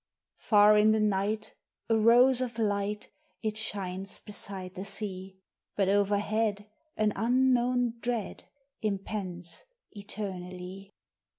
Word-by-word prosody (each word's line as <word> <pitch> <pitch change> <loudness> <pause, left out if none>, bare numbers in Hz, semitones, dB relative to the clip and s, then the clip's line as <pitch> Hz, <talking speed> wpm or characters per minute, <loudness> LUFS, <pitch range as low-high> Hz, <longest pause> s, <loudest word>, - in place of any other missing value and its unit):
Far 210 0 +6
in 215 +1 +5
the 220 - +2
night, 210 +1 0 0.3
a 225 - +3
rose 240 +4 +5
of 240 -2 -3
light 205 -1 -1 0.3
It 215 -1 -1
shines 195 -3 -4
beside 195 -3 -8
the 190 - -6
sea; 190 -2 -3 0.4
But 195 -2 +2
overhead 205 +1 +1 0.3
an 215 -1 +2
unknown 245 0 +2
dread 235 -4 -3 0.4
Impends 195 -4 -4 0.3
eternally. 195 -2 -7
210 Hz, 105 wpm, -29 LUFS, 195-220 Hz, 0.4 s, Far